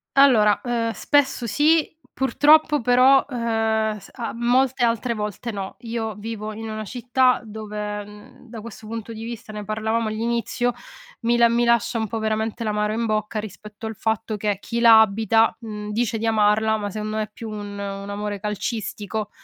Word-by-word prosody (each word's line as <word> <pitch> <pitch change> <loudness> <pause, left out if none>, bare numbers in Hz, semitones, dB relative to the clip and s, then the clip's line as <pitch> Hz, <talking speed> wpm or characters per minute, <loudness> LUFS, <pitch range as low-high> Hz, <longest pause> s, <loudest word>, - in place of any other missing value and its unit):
Allora, 235 -7 +5
uhm, 235 -2 -1
spesso 270 +2 +1
sì, 300 +7 +3 0.2
purtroppo 295 +2 +4
però, 255 +3 +5
uhm, 225 -3 0
s - - -14
a 240 -3 -4
molte 245 +2 +2
altre 235 +1 +1
volte 210 +2 -4
no; 195 -2 -6
io 225 -2 -4
vivo 215 0 -5
in 225 +1 -7
una 215 0 -4
città 250 +3 +1
dove, 210 -1 -5
mhmm, 210 +4 -15
da 230 - -8
questo 220 0 -10
punto 230 0 -6
di 225 0 -8
vista, 230 -1 -7
ne 210 0 -5
parlavamo 220 +2 -1
all'inizio, 235 +2 -1 0.5
mi 235 +1 +2
la 235 0 +6
mi 235 +1 +2
lascia 235 -1 +2
un 220 - -1
po' 225 - -4
veramente 220 +1 -2
l'amaro 210 -1 0
in 230 +1 -1
bocca, 215 0 -1
rispetto 210 +1 -9
al 220 - -4
fatto 220 +1 -2
che, 205 -1 -1
chi 235 +3 -4
la 230 -2 +8
abita, 220 +1 +3
mhmm, 210 -2 -6
dice 225 +1 0
di 225 - -3
amarla, 220 0 +3
ma 205 -1 -3
secondo 215 +1 -4
me 215 - +1
è 210 - -8
più 225 0 -8
un 205 -1 -6
un 200 0 -5
amore 205 0 -4
calcistico 210 0 -4
220 Hz, 180 wpm, -23 LUFS, 210-235 Hz, 0.5 s, la